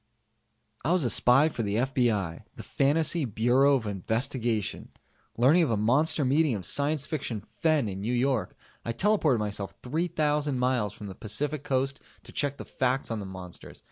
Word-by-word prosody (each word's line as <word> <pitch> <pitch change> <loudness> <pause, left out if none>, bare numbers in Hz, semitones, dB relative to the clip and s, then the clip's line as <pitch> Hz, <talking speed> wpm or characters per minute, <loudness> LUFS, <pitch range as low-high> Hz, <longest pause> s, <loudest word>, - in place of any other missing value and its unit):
I 160 +7 +2
was 180 -4 +2
a 120 - +1
spy 125 +7 +5
for 145 - -4
the 100 -2 -1
FBI 115 -8 0
the - - -9
Fantasy 155 +3 +1
Bureau 125 +4 +3
of 125 -4 -2
Investigation! 110 +2 -2 0.5
Learning 140 +9 +5
of 160 - +2
a 115 - +1
monster 135 +7 +2
meeting 140 0 +2
of 95 -4 -5
science 145 - 0
fiction 135 -8 -3
"fen" 155 -7 +1
in 95 -1 -5
New 120 +4 -1
York, 130 -1 0 0.3
I 115 - -3
teleported 165 - +2
myself 105 -2 -4
3,000 150 -1 0
miles 125 -5 0
from 105 - -10
the 100 - -7
Pacificoast 135 +4 -2 0.2
to - - -12
check 140 -1 -1
the - - -8
facts 130 -1 -1
on 115 - -2
the 100 - -6
monsters. 95 -2 -10
130 Hz, 170 wpm, -27 LUFS, 110-145 Hz, 0.5 s, spy